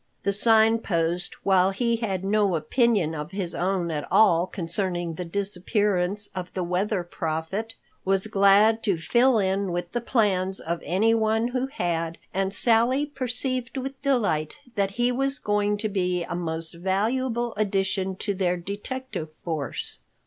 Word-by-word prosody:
The 200 - +1
Sign 225 +2 +6
Post, 175 -3 -2
while 190 -1 +4
he 235 +4 0
had 195 -5 -3
no 200 -2 +2
opinion 190 - +1
of 150 0 -5
his 185 -2 -4
own 180 -1 -1
at 150 -2 -3
all 180 -5 +4
concerning 175 -1 -2
the 180 - -5
disappearance 200 +1 0
of 180 -1 -6
the 185 - -1
Weather 180 +2 -1
Prophet, 175 +7 -4 0.3
was 195 +1 +1
glad 210 +2 +4
to 200 -6 +1
fall 240 +9 +3
in 195 -1 0
with 175 0 -4
the 240 - -2
plans 195 -6 +2
of 170 +1 -4
anyone 220 +3 +1
who 255 +1 -1
had, 170 - -2 0.2
and 195 0 0
Sally 235 +6 +3
perceived 255 -2 -1
with 265 +1 -5
delight 210 - 0 0.2
that 200 -3 0
he 240 +1 +2
was 270 +2 -1
going 205 0 0
to 215 +1 -2
be 180 -3 -1
a - - -6
most 165 -1 -4
valuable 230 +7 -1
addition 195 -2 -1
to 200 +2 -2
their 180 -2 0
detective 205 0 -6
force. 155 -7 -3
195 Hz, 150 wpm, -25 LUFS, 175-225 Hz, 0.3 s, Sign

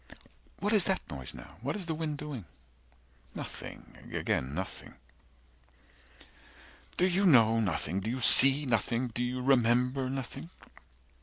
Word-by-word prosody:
"What 205 +2 -2
is 205 -5 +4
that 190 -1 -1
noise 65 -3 -7
now? - - -14
What 140 +5 -4
is 200 -4 -5
the 165 - -4
wind 155 -2 -5
doing?" 145 - -8 0.9
Nothing - - -10
again 65 +3 -3
nothing. 95 -7 -8 2.0
120 - - -27
"Do 180 - +2
You 190 +2 +1
know 115 -7 +4
nothing? 95 -3 -3
Do 100 +3 -5
you 130 +3 -4
see 135 +4 +8
nothing? 120 +1 -2
Do 120 +2 -4
you 125 +1 -4
remember 125 0 +1
Nothing?" 135 +5 -7
130 Hz, 140 wpm, -29 LUFS, 115-150 Hz, 2.0 s, see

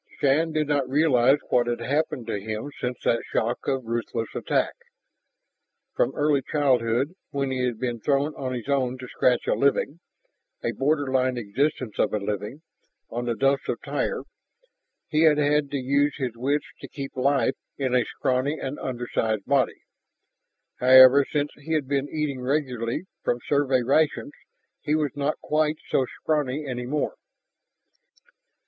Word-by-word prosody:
Shann 150 +4 +2
did 155 -1 0
not 140 -3 0
realize 135 -2 +4
what 120 -1 +3
had 120 -1 -1
happened 130 0 -1
to 110 -3 -3
him 110 +7 -5
since 125 0 -3
that 115 - +2
shock 120 +2 -1
of 135 -2 -1
ruthless 115 0 -3
attack. - - 0 1.2
From 120 - +1
early 145 -1 +2
childhood, 130 0 +1 0.2
when 140 -2 -2
he 130 - -2
had 125 -3 -1
been 120 -1 -3
thrown 140 +5 +1
on 130 -1 -4
his 125 -2 -5
own 130 -3 0
to 125 0 -8
scratch 125 0 +1
a - - +2
living 140 +3 +1 0.6
a - - 0
borderline 135 -3 +1
existence 120 +1 -2
of - - +2
a - - +2
living 105 +8 -4 0.5
on 120 +1 -3
the 120 -1 -1
Dumps 135 +3 +1
of - - -1
Tyr, - - -2 0.8
he 155 -1 +1
had 155 -2 +5
had 150 -1 +2
to 140 - -2
use 140 +3 +1
his 130 -5 -3
wits 140 +5 0
to - - -8
keep 140 -1 -7
life 135 0 +2 0.2
in 130 -3 -1
a 125 -1 +4
scrawny 135 +4 -1
and 135 +2 -5
undersized 120 -4 -2
body. 140 -2 +1 1.0
However, 130 +2 +8
since 145 -1 0
he 155 +3 -5
had 150 -4 0
been 140 0 -1
eating 150 -4 -2
regularly 125 -2 -1 0.2
from 120 - 0
Survey 135 -3 +2
rations, 145 +3 +1 0.5
he 150 - 0
was 150 -2 0
not 145 +1 -1
quite 155 0 +1
so 130 - +3
scrawny 150 -1 -2
any 125 -1 -4
more. 150 +3 -1
135 Hz, 155 wpm, -25 LUFS, 125-145 Hz, 1.2 s, However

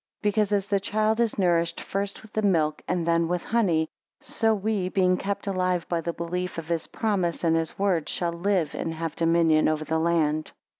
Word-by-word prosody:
Because 210 0 +1
as 200 -2 +1
the 200 -1 +1
child 215 +3 0
is 235 -2 +1
nourished 170 -3 +1
first 200 +1 -4
with 215 0 -3
milk, 160 -6 +2
and 175 -2 0
then 170 0 +2
with 175 0 -1
honey; 180 -9 +1 0.3
so 225 -1 +1
we 205 -3 0
being 185 -1 +3
kept 200 +2 -3
alive 185 -3 0
by 170 -1 -1
the 170 - -2
belief 180 +2 -4
of 165 0 -6
his 165 -1 -1
promises 190 -7 -1
and 165 -1 +3
his 165 0 -1
word, 190 -5 +1
shall 170 -1 -1
live 175 -2 0
and 165 0 -3
have 165 -1 -4
dominion 165 -2 +3
over 155 0 0
the 160 +1 0
land. 155 -2 +1
175 Hz, 195 wpm, -26 LUFS, 165-200 Hz, 0.3 s, being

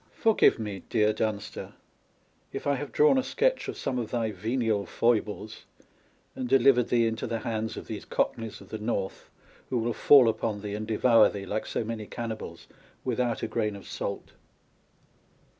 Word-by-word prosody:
Forgive 225 -2 +4
me, 105 -4 -5
dear 110 -2 +3
Dunster, 105 -1 -3 0.8
if 135 - -6
I 145 - +2
have 140 -1 -4
drawn 150 - +5
a - - 0
sketch - - 0
of - - -5
some 130 -2 -2
of 115 -3 -4
thy 115 -2 -1
venial 110 0 -1
foibles, 110 -1 -1 0.7
and 125 -1 -4
delivered 135 -2 +5
thee 120 -1 +3
into 115 0 -2
the 115 -1 -3
hands 110 -1 -3
of - - -7
these - - -6
Cockneys 115 -2 -2
of - - -14
the 110 - -5
North, 105 -3 -3 0.4
who 125 - 0
will 120 0 0
fall 135 -1 +7
upon 110 -2 -1
thee 105 -1 -5
and 105 +1 -4
devour 115 0 +5
thee, 100 -1 -6
like 110 +3 -3
so - - -2
many 110 -1 -5
cannibals, 110 -8 -6 0.4
without 125 -2 -1
a - - 0
grain 105 -3 -1
of 100 - -11
salt - - -5
115 Hz, 175 wpm, -28 LUFS, 105-125 Hz, 0.8 s, fall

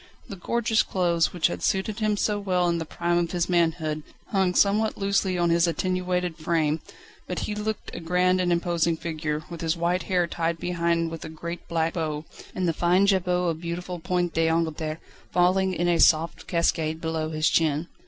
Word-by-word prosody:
The 200 - -5
gorgeous 225 +4 +1
clothes, 170 -3 +1
which 175 -3 -1
had - - 0
suited 195 +3 0
him 215 -1 +1
so 205 0 0
well 180 -3 +1
in 170 -1 +1
the 165 - -4
prime 175 +1 0
of 170 +1 -2
his 175 -1 0
manhood, 165 -3 +1 0.3
hung 190 -3 +1
somewhat 210 +2 +3
loosely 195 -2 +1
on 170 -1 +2
his 170 +1 +4
attenuated 180 -1 -1
frame, 155 -1 0 0.5
but - - -4
he 210 - -3
looked 210 0 -4
a - - -5
grand 180 +2 +2
and 175 -1 +1
imposing 170 -1 +1
figure, 155 -2 -3
with 170 - -6
his 165 0 0
white 175 +2 +1
hair 180 -2 +1
tied 170 -1 -2
behind 170 -1 0
with 165 - -7
a - - -6
great 170 +2 -7
black 165 -1 0
bow, 155 -2 -3 0.3
and 185 -1 0
the 165 - +1
fine 175 +4 +3
jabot 180 -3 +2
of 160 0 -7
beautiful 175 +1 -4
point 175 -1 -1
d'Angleterre 160 -1 0 0.3
falling 185 +2 +3
in 175 -1 -1
a 175 -1 +2
soft 160 +1 +3
cascade 160 -2 0
below 160 -1 -2
his 155 0 +1
chin. 160 0 +1
170 Hz, 190 wpm, -25 LUFS, 165-185 Hz, 0.5 s, his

